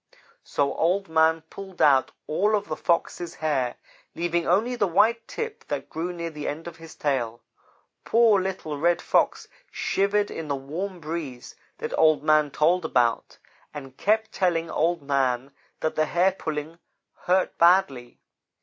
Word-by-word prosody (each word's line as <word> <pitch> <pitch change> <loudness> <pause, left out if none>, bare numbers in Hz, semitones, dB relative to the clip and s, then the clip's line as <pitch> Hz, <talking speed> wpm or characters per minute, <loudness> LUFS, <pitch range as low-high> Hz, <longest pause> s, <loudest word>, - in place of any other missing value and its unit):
"So 140 -1 -1
Old 185 +3 0
man 160 0 +3
pulled 190 -2 -10
out 135 -3 +4
all 205 +7 +1
of 205 -1 -3
the 155 - -2
Fox's 170 0 -1
hair, 135 -6 -1 0.4
leaving 170 0 -1
only 220 +8 +2
the 205 -4 +1
white 220 +6 +2
tip 455 -1 -5
that - - -4
grew 170 +3 -3
near 170 -1 -5
the 150 -1 -6
end 155 +3 -4
of 170 -1 -9
his 165 0 -12
tail. 120 -5 -2 0.6
Poor 225 -4 +4
little 180 -6 -4
Red 170 +2 +2
Fox - - +1 0.2
shivered 205 +1 0
in 165 -1 -6
the 140 - -1
warm 170 +8 -5
breeze 155 -6 -6 0.2
that - - -4
Old 155 -3 +4
man 155 -1 +3
told 165 +5 +2
about, 120 -7 0 0.4
and 135 -3 -8
kept 220 +7 +1
telling 170 -3 0
Old 165 -1 0
man 135 -2 0 0.3
that 155 - 0
the 155 - +1
hair 180 +4 +3
pulling 160 -2 -5 0.5
hurt 185 +1 +2
badly. 170 -9 +3
165 Hz, 155 wpm, -25 LUFS, 150-185 Hz, 0.6 s, out